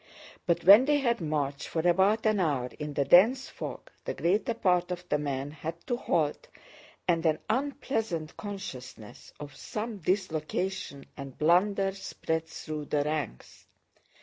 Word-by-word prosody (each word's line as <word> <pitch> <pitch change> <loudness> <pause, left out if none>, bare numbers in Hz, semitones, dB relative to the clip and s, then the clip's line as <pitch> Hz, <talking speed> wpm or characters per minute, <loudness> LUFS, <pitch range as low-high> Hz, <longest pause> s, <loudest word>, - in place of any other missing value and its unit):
But 170 - +1
when 205 +8 +9
they 295 +1 +3
had 235 -6 0
marched 145 -3 -2
for 165 +1 -1
about 195 +6 +3
an 215 -2 +3
hour 140 -8 0
in 150 -1 -5
the 140 - +1
dense 230 - +5
fog, - - -7
the - - -4
greater 205 +6 +1
part 180 -5 +2
of 180 0 -5
the 150 - +2
men 140 -1 -3
had 155 +2 -5
to 245 - 0
halt 160 -10 -1 0.6
and 165 -2 +2
an 155 -2 +3
unpleasant 225 - -2
consciousness 130 - -8
of 145 -2 -9
some 215 +5 -5
dislocation 180 -4 -2
and 140 -2 -9
blunder 195 +5 +3
spread 160 -4 -3
through 155 -2 -6
the 145 0 0
ranks. 150 - -5
170 Hz, 150 wpm, -29 LUFS, 150-205 Hz, 0.6 s, when